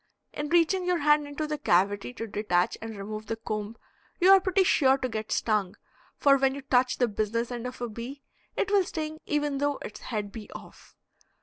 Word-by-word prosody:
In 295 0 -4
reaching 345 +3 +3
your 360 0 +1
hand 295 -1 +3
into 290 +2 -4
the 300 -1 -3
cavity 200 -1 +2
to 225 - -4
detach 200 -4 0
and 225 -1 -7
remove 215 +2 -6
the 225 - -2
comb 215 0 -5 0.4
you 370 +2 +6
are 390 - +9
pretty 380 +1 +2
sure 270 -7 +4
to 255 - -2
get 220 -2 -5
stung, 210 -3 0 0.4
for 275 -1 +5
when 270 0 +1
you 280 - -7
touch 255 -1 +2
the 245 - +2
"business 230 +3 -2
end" 240 0 -4
of 250 - -8
a 240 - -1
bee, 240 +5 -8 0.3
it 400 - 0
will 400 -2 +5
sting 315 -3 -5
even 295 -2 0
though 285 0 0
its 210 - -8
head 210 -4 -4
be 215 -1 -9
off. - - -13
255 Hz, 205 wpm, -27 LUFS, 215-295 Hz, 0.4 s, are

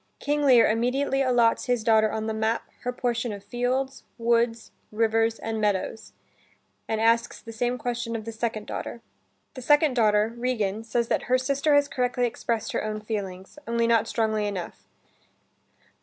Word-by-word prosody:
King 295 +1 -1
Lear 255 -5 +6
immediately 260 +5 +1
allots 245 -3 +3
his 245 -3 0
daughter 220 -1 +4
on 220 0 -3
the 220 - -2
map, 220 +1 0 0.2
her 250 - -3
portion 240 -1 -2
of 200 -1 -7
fields, 250 +5 -2
woods, 230 -1 +1 0.2
rivers, 225 +1 +1
and 220 -1 -4
meadows, 205 +1 -2 0.7
and 220 - -1
asks 230 +1 +2
the 230 - -10
same 245 +2 -1
question 240 -1 -3
of 220 -2 -5
the 230 - -4
second 220 -1 -3
daughter. 235 - -6 0.5
The 255 - -8
second 295 +2 +4
daughter, 215 -1 +3
Regan, 225 -4 -1
says 230 +1 -1
that - - 0
her 255 - +5
sister 280 +3 +1
has 285 0 +4
correctly 250 -2 0
expressed 235 -1 -2
her - - -2
own 215 0 -3
feelings, 200 +1 -6
only 235 0 +1
not 230 -2 +3
strongly 220 -2 0
enough. 190 -4 -6
230 Hz, 165 wpm, -26 LUFS, 220-250 Hz, 0.7 s, Lear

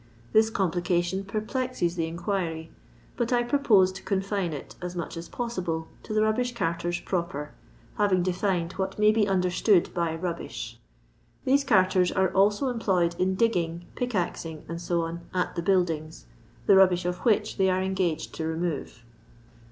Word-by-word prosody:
This 220 0 +5
complication 180 -1 0
per 200 +2 -3
plexes 255 -7 -1
the 165 -2 -1
inquiry, 165 -2 -3 0.5
but 240 -1 -1
I 240 -1 +3
purpose 235 -8 +4
to 195 - -9
confine 195 -2 -1
it, 145 -3 -7
as 180 0 -5
mnch 170 -2 -4
as 165 +1 -7
possible, 180 -9 -3
to - - -10
the 215 0 +3
rubbish 245 +3 0
carters 170 -3 -1
proper, 170 -5 -3 0.5
having 195 -4 +3
defined 180 -1 0
what 190 0 -2
may 210 0 +5
be 215 -1 +2
understood 180 0 +2
by 170 -2 -1
"rubbish." 170 0 -5 0.7
These 275 +1 +3
carters 185 -6 +4
ore 190 -1 +2
also 205 +7 +3
employed 190 -8 +1
in 185 +1 +1
digginff, 175 -7 +1
plek 245 0 -2
azing, 165 -4 -2 0.2
&c., 170 -1 -1 0.2
at 180 - 0
the 170 - -1
buildings, 165 - 0 0.4
the 200 - +6
rubbish 185 -2 +5
of 180 0 -2
which 215 -2 +1
they 190 -1 +3
are 185 0 +1
engaged 190 -4 -1
to 160 - -3
remove. 160 -7 -3
185 Hz, 155 wpm, -27 LUFS, 170-210 Hz, 0.7 s, the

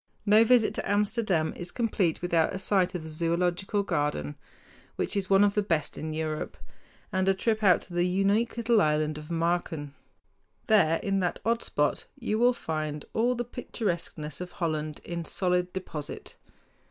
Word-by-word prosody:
No 215 +2 +6
visit 230 -1 +4
to - - -4
Amsterdam 205 -6 +1
is 175 - -6
complete 200 -9 0
without 170 0 +2
a - - -2
sight 190 -1 +1
of 170 - -4
the - - -8
Zoölogical 175 +5 0
Garden, 145 - -1 0.6
which - - -2
is 195 -2 -1
one 195 +1 +6
of 205 -1 +3
the 210 - +2
best 165 -7 -1
in 155 0 -4
Europe, 155 -1 -3 0.6
and 190 +1 +2
a 195 - +3
trip 220 +3 0
out 190 -4 +5
to 180 - -11
the 175 +1 +2
unique 200 +6 +1
little 230 -2 +3
Island 155 -1 +1
of 150 +1 -11
Marken. 165 -3 -1 0.7
There 180 -7 +4
in 195 -1 +1
that 175 -2 -1
odd 230 +1 +2
spot 150 0 0
you 225 -4 -1
will 245 +1 +5
find 155 -7 -4
all 240 +3 +2
the 240 0 -3
picturesqueness 175 - -4
of 180 0 -7
Holland 155 -4 -3
in 170 -1 -4
solid 180 +1 0
deposit. 165 -6 -6
180 Hz, 170 wpm, -28 LUFS, 160-205 Hz, 0.7 s, No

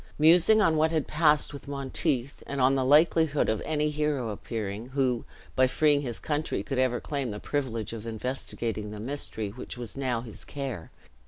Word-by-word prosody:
Musing 175 +8 +6
on 160 -4 +3
what 160 +1 +4
had 160 -3 0
passed 150 -1 +3
with 140 - -9
Monteith, 140 -1 -1
and 140 - -3
on 130 +1 +5
the 135 -1 +1
likelihood 150 +2 +4
of 110 -1 0
any 150 -1 0
hero 150 -5 -1
appearing, 105 +1 -4
who, 130 -3 0 0.3
by 130 0 +5
freeing 145 +2 +3
his 120 -5 -4
country, 150 0 -2
could 135 -2 -2
ever 130 -2 +2
claim 140 -4 -3
the 105 -1 -5
privilege 115 -7 -2
of 115 0 -7
investigating 115 -2 -3
the 105 0 -7
mystery 110 -3 -4
which 120 +4 -8
was 120 -3 -7
now 130 -4 -1
his 115 -3 -9
care. 135 - -5
135 Hz, 180 wpm, -28 LUFS, 115-150 Hz, 0.3 s, Musing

